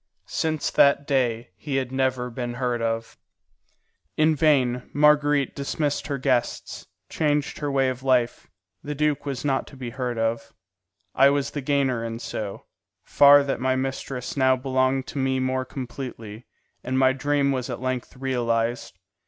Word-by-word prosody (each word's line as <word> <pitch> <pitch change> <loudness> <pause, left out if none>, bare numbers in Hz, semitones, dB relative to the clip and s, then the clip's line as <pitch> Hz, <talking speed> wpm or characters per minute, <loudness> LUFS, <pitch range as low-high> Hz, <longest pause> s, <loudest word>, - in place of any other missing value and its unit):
Since 155 -1 -1
that 140 0 +4
day 120 -7 0
he 135 +6 -4
had 130 -2 -1
never 130 -2 -1
been 120 0 -4
heard 120 -2 -1
of. 115 0 -3 1.0
In 155 0 +4
vain 130 -5 +2
Marguerite 145 -1 +3
dismissed 145 +1 -2
her 140 -2 -2
guests, 130 -2 -1 0.2
changed 150 -2 -1
her 145 - -2
way 135 -1 +2
of 130 0 -3
life; 125 -3 +1 0.3
the 150 0 -5
duke 150 -1 0
was 135 -1 -4
not 135 -2 0
to 135 - -13
be 125 -2 -6
heard 125 -1 -3
of. 115 0 -2 0.6
I 135 +1 +6
was 140 -1 0
the 145 - -4
gainer 135 -4 0
in 115 0 -4
so 105 -4 -6 0.4
far 145 0 +7
that 140 -2 -3
my 130 0 +1
mistress 130 -1 -4
now 130 -2 +4
belonged 130 0 0
to 140 - -6
me 130 0 +1
more 130 0 -1
completely, 120 -4 -8 0.4
and 130 +1 -2
my 130 0 +4
dream 140 +1 +1
was 130 -1 -2
at 120 - -4
length 130 0 -4
realized. 120 -6 -1
130 Hz, 160 wpm, -24 LUFS, 125-140 Hz, 1.0 s, far